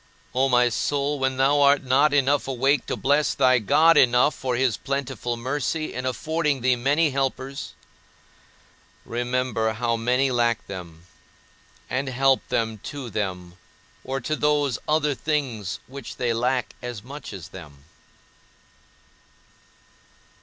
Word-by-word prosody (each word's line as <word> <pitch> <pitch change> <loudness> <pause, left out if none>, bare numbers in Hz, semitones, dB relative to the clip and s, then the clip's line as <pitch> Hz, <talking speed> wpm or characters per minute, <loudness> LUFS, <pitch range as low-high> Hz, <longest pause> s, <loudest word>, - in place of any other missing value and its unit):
O 130 +2 +2
my 125 -1 +4
soul, 140 +4 -1
when 130 -1 0
thou 140 +2 +3
art 140 0 +4
not 135 +3 +3
enough 140 0 +2
awake 135 +1 +1
to - - -1
bless 145 +2 +1
thy 130 -1 +4
God 160 +10 +4
enough 125 +3 +4
for 130 -2 -3
his 125 -2 +1
plentiful 130 -3 -3
mercy 145 +5 -2
in 125 +1 -3
affording 150 +2 -1
thee 125 0 +3
many 145 +6 +2
helpers, 135 0 -3 1.3
remember 120 -2 -1
how 115 +1 -1
many 125 +4 +1
lack 120 -2 +1
them, 85 -3 -9 0.8
and 135 +1 -2
help 135 +1 +3
them 110 -2 -1
to 130 +1 -7
them 90 -4 -4 0.5
or 135 +1 -3
to 155 +5 -2
those 145 -4 +1
other 150 -1 +2
things 125 - -2
which 135 -2 -9
they 120 -2 0
lack 125 +2 -1
as 120 -4 -6
much 140 +4 -9
as 90 -6 -9
them. 75 -7 -12
130 Hz, 130 wpm, -24 LUFS, 120-140 Hz, 1.3 s, my